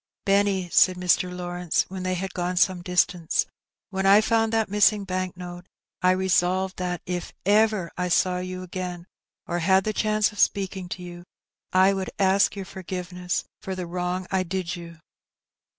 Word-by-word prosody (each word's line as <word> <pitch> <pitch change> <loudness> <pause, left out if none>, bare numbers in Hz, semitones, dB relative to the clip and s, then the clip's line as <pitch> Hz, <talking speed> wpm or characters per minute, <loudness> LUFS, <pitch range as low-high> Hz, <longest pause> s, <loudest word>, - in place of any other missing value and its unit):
"Benny," 195 -2 +2
said 185 - +5
Mr. 180 0 +2
Lawrence, 175 -1 -1
when 190 0 -6
they 185 0 -1
had 185 +1 -4
gone 180 0 -2
some 180 0 +3
distance, 180 -2 +1 0.5
"when 190 0 0
I 200 +2 +8
found 225 0 +2
that 225 -1 +1
missing 205 +1 +3
bank 185 -1 -3
note, 180 0 -8 0.3
I 180 - +4
resolved 185 0 +1
that, 180 -2 -3
if 175 -1 -4
ever 210 -3 +3
I 180 0 -1
saw 180 +1 +2
you 185 0 -5
again 180 -1 -5 0.4
or 175 - -2
had 190 +3 +3
the 215 - -1
chance 215 0 +1
of 205 - -11
speaking 190 -2 0
to 180 - -6
you, 175 0 -9 0.5
I 190 +1 +5
would 190 -1 -3
ask 195 +1 +3
your 195 -1 -5
forgiveness 180 -1 -4 0.2
for 190 - -5
the 185 -1 -4
wrong 180 +1 -3
I 190 -1 +2
did 185 -1 -3
you." 170 -1 -10
185 Hz, 170 wpm, -25 LUFS, 180-195 Hz, 0.5 s, I